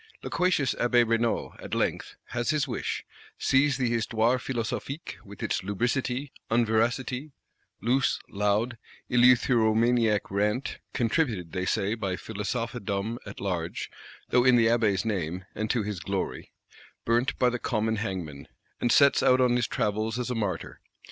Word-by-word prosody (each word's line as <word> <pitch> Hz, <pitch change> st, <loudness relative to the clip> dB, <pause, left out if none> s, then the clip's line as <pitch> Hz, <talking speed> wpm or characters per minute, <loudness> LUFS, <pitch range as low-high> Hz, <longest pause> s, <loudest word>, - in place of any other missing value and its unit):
Loquacious 175 Hz, -8 st, +1 dB
Abbé 120 Hz, 0 st, +4 dB
Raynal, 115 Hz, 0 st, 0 dB
at -, -, -4 dB
length, -, -, -1 dB
has 120 Hz, 0 st, -2 dB
his 150 Hz, -2 st, +1 dB
wish; 120 Hz, -, -3 dB, 0.3 s
sees 135 Hz, 0 st, +3 dB
the 130 Hz, -2 st, +1 dB
Histoire 115 Hz, +1 st, +1 dB
Philosophique, 130 Hz, +5 st, -4 dB
with 100 Hz, 0 st, -10 dB
its -, -, 0 dB
"lubricity," 125 Hz, +7 st, -1 dB, 0.2 s
unveracity, 120 Hz, +5 st, 0 dB, 0.5 s
loose 125 Hz, +2 st, +2 dB
loud 105 Hz, +4 st, 0 dB, 0.3 s
eleutheromaniac 120 Hz, -3 st, +4 dB
rant 105 Hz, +6 st, -1 dB, 0.2 s
(contributed, 115 Hz, -, 0 dB
they 90 Hz, -1 st, -2 dB
say, 100 Hz, +2 st, +1 dB
by 100 Hz, -5 st, -2 dB
Philosophedom 110 Hz, 0 st, -3 dB
at 100 Hz, -, -8 dB
large, 90 Hz, -4 st, -3 dB, 0.4 s
though 125 Hz, -, +4 dB
in 125 Hz, -1 st, +6 dB
the 115 Hz, -1 st, +5 dB
Abbé's 115 Hz, -3 st, +2 dB
name, 90 Hz, -4 st, -2 dB
and 110 Hz, +1 st, -3 dB
to 120 Hz, -4 st, +1 dB
his 105 Hz, -3 st, -4 dB
glory), 80 Hz, -, -4 dB, 0.5 s
burnt 120 Hz, +2 st, +1 dB
by 125 Hz, -, +4 dB
the 125 Hz, 0 st, -3 dB
common 110 Hz, -1 st, 0 dB
hangman;—and 95 Hz, +2 st, -4 dB
sets 140 Hz, +2 st, +5 dB
out 130 Hz, 0 st, +4 dB
on 125 Hz, -1 st, +4 dB
his 120 Hz, -2 st, +1 dB
travels 110 Hz, -1 st, -1 dB
as 125 Hz, 0 st, -2 dB
a -, -, -1 dB
martyr. 100 Hz, -6 st, -3 dB
115 Hz, 140 wpm, -27 LUFS, 105-125 Hz, 0.5 s, in